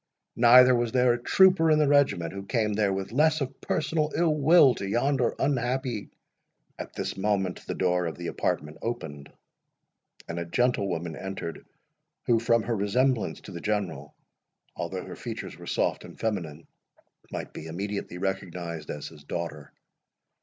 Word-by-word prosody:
Neither 125 Hz, +2 st, +8 dB
was 120 Hz, -1 st, +1 dB
there 125 Hz, -1 st, +4 dB
a 120 Hz, -, -4 dB
trooper 185 Hz, +1 st, +5 dB
in 155 Hz, -, +5 dB
the 150 Hz, -1 st, +3 dB
regiment 140 Hz, -, +2 dB
who 100 Hz, -, -5 dB
came 105 Hz, 0 st, 0 dB
there 105 Hz, -1 st, +1 dB
with 95 Hz, +1 st, -3 dB
less 155 Hz, +5 st, +3 dB
of 135 Hz, -1 st, -5 dB
personal 155 Hz, 0 st, 0 dB
ill 165 Hz, -2 st, +3 dB
will 150 Hz, -2 st, +6 dB
to 100 Hz, -, -5 dB
yonder 125 Hz, +2 st, +1 dB
unhappy"— 125 Hz, -4 st, -1 dB, 0.7 s
At -, -, -7 dB
this -, -, -3 dB
moment 95 Hz, -2 st, -1 dB
the -, -, -3 dB
door 90 Hz, -1 st, +1 dB
of 80 Hz, -, -5 dB
the 85 Hz, -, -7 dB
apartment 75 Hz, -2 st, -2 dB
opened, 75 Hz, -12 st, -5 dB, 1.0 s
and 85 Hz, +1 st, -4 dB
a 85 Hz, -, -3 dB
gentlewoman 90 Hz, -6 st, 0 dB
entered, 95 Hz, -2 st, -6 dB, 0.6 s
who, 115 Hz, -2 st, +3 dB
from 115 Hz, 0 st, +2 dB
her 120 Hz, -, -1 dB
resemblance 115 Hz, +4 st, 0 dB
to -, -, -11 dB
the 85 Hz, -, -7 dB
General, 95 Hz, -9 st, -3 dB, 0.6 s
although -, -, -4 dB
her -, -, -8 dB
features -, -, -6 dB
were -, -, -10 dB
soft -, -, 0 dB
and -, -, -12 dB
feminine, 85 Hz, -8 st, -3 dB, 0.7 s
might -, -, -6 dB
be 80 Hz, -, -8 dB
immediately 100 Hz, +2 st, -4 dB
recognised 90 Hz, -4 st, -4 dB
as 75 Hz, -, -5 dB
his 75 Hz, -3 st, -15 dB
daughter. 75 Hz, -2 st, -5 dB
105 Hz, 160 wpm, -27 LUFS, 85-125 Hz, 1.0 s, Neither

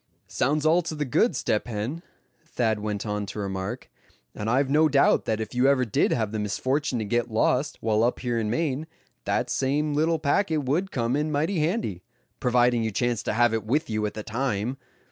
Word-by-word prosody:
"Sounds 150 Hz, +3 st, 0 dB
all 165 Hz, +3 st, +4 dB
to 165 Hz, -2 st, -5 dB
the 150 Hz, -1 st, -2 dB
good, 150 Hz, -, +2 dB
Step 110 Hz, -2 st, -1 dB
Hen," 120 Hz, +8 st, -4 dB, 0.4 s
Thad 115 Hz, -9 st, -1 dB
went 105 Hz, 0 st, -3 dB
on 105 Hz, -1 st, -2 dB
to 100 Hz, -, -7 dB
remark; 95 Hz, -2 st, -4 dB, 0.5 s
"and 105 Hz, +1 st, -4 dB
I've 135 Hz, +4 st, +2 dB
no 155 Hz, +3 st, +4 dB
doubt 140 Hz, -1 st, +3 dB
that 110 Hz, -1 st, -1 dB
if 110 Hz, -, -5 dB
you 125 Hz, +2 st, +3 dB
ever 135 Hz, -2 st, +3 dB
did 110 Hz, -, +1 dB
have 110 Hz, -4 st, 0 dB
the 110 Hz, -, -3 dB
misfortune 130 Hz, +7 st, -1 dB
to 110 Hz, -, -2 dB
get 120 Hz, +3 st, 0 dB
lost, 125 Hz, +6 st, +1 dB
while 110 Hz, -1 st, +1 dB
up 120 Hz, -, 0 dB
here 120 Hz, -2 st, -1 dB
in 110 Hz, -1 st, -1 dB
Maine, 150 Hz, +3 st, -1 dB, 0.4 s
that -, -, 0 dB
same 145 Hz, +3 st, 0 dB
little 160 Hz, +3 st, +2 dB
packet 155 Hz, +1 st, +1 dB
would 160 Hz, +9 st, 0 dB
come 120 Hz, -3 st, -1 dB
in 150 Hz, +1 st, 0 dB
mighty 160 Hz, +5 st, 0 dB
handy, 155 Hz, -, -1 dB, 0.4 s
providing 125 Hz, -1 st, +3 dB
you 110 Hz, -, 0 dB
chanced 120 Hz, +1 st, -1 dB
to -, -, 0 dB
have 120 Hz, +1 st, +3 dB
it 110 Hz, -2 st, -1 dB
with 125 Hz, +3 st, 0 dB
you 110 Hz, 0 st, -1 dB
at 105 Hz, -, -7 dB
the 110 Hz, -, -5 dB
time. 120 Hz, +1 st, -2 dB
125 Hz, 205 wpm, -26 LUFS, 110-150 Hz, 0.5 s, all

